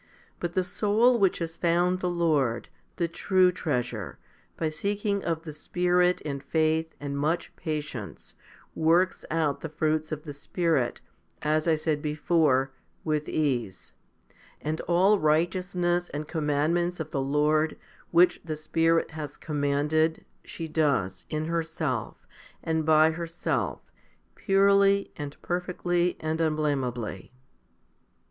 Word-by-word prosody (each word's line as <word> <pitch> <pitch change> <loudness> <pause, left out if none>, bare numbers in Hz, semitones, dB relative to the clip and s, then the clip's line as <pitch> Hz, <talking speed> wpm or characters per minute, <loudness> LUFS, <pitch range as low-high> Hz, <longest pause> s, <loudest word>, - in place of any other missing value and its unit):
But 175 -1 -3
the 185 - +1
soul 220 +6 +2
which 195 -3 +3
has 165 0 -4
found 175 +1 +2
the 180 - -1
Lord, 155 -9 +1 0.3
the 170 - 0
true 185 +2 +3
treasure, 125 - -3 0.4
by 160 - 0
seeking 200 +5 -1
of 165 -1 -2
the 155 -2 -7
Spirit 180 +3 +1
and 140 -2 -3
faith 160 +2 0
and 140 -1 -4
much 155 +5 -1
patience, 150 -9 -5 0.4
works 170 +3 +2
out 155 -3 0
the 160 - -5
fruits 155 0 -1
of 150 -1 -4
the 150 -3 -7
Spirit, 145 -3 -1 0.4
as 155 +2 +1
I 160 - +4
said 155 -1 -1
before, 150 -3 +2 0.3
with 155 -1 -1
ease; 125 -11 -2 0.7
and 155 +1 -3
all 190 +4 +4
righteousness 175 +2 +1
and 150 +1 -5
commandments 160 +3 0
of 155 -1 -5
the 135 - -1
Lord, 150 +3 +1 0.3
which 175 +1 +4
the 155 -2 -4
Spirit 165 +2 +1
has 150 -2 -7
commanded, 150 +2 0 0.2
she 165 - -6
does, 140 - 0
in 155 0 -2
herself, 165 0 -3 0.4
and 160 -1 -1
by 155 0 +6
herself, 170 +1 -2 0.5
purely, 200 0 +3
and 145 -2 -7
perfectly, 175 0 -1
and 155 +1 -2
unblameably. 135 - -1
160 Hz, 125 wpm, -27 LUFS, 150-175 Hz, 0.7 s, by